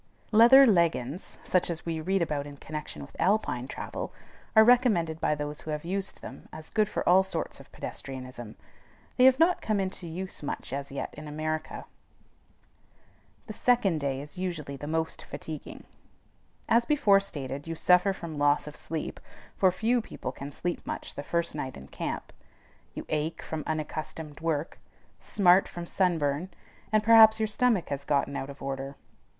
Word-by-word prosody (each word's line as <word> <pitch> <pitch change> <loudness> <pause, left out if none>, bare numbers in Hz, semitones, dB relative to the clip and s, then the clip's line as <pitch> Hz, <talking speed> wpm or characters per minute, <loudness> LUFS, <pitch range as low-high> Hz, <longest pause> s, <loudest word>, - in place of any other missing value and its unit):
Leather 240 +5 +9
leggins, 170 - +1
such 180 -1 +1
as 170 -1 -3
we 165 -1 -2
read 190 +2 +1
about 145 -3 -2
in 145 -1 -10
connection 150 - -7
with - - -13
Alpine 180 - +1
travel, - - -5 0.4
are 220 - +9
recommended 220 -10 +3
by 150 - +2
those 150 0 -5
who - - -9
have 150 +1 -3
used 195 +2 -3
them - - -10
as 155 0 -10
good 215 -1 +2
for - - -3
all 185 +2 +7
sorts 190 -4 -4
of - - -15
pedestrianism. 130 -4 -7 0.6
They 250 - +6
have 260 0 +7
not 335 +3 +3
come 215 -2 0
into 185 -2 -3
use 185 +3 -5
much 140 -3 -5
as 140 0 -4
yet 140 - -4
in 150 +1 -9
America. 155 +1 -4 1.6
The - - -7
second 235 - +2
day 140 -2 -2
is 150 +4 -10
usually 160 -6 -4
the 145 +2 -7
most 160 +1 -2
fatiguing. 155 -2 -8 0.8
As 235 +1 +4
before 235 -8 +4
stated, 145 -6 -6
you 165 - -3
suffer 180 +4 +4
from 170 -5 -6
loss 145 0 +3
of 150 0 -9
sleep 160 -1 -5 0.4
(for 190 -2 +4
few 230 +6 +1
people - - -6
can 140 +1 -8
sleep 175 +4 -3
much - - -5
the - - -5
first 170 +3 -1
night 130 -3 -5
in 70 - -11
camp), - - -5 0.6
you - - -6
ache 155 +2 -2
from 155 -1 -4
unaccustomed 155 -1 -4
work, 160 -1 -2 0.4
smart 185 -1 +4
from 175 0 -7
sunburn, 170 -3 0 0.4
and 215 -1 +3
perhaps 220 0 +8
your 220 - +2
stomach 215 -2 +1
has 140 0 -3
gotten 140 -1 0
out 135 - -4
of 140 0 -10
order. 135 0 -4
160 Hz, 170 wpm, -28 LUFS, 145-195 Hz, 1.6 s, Leather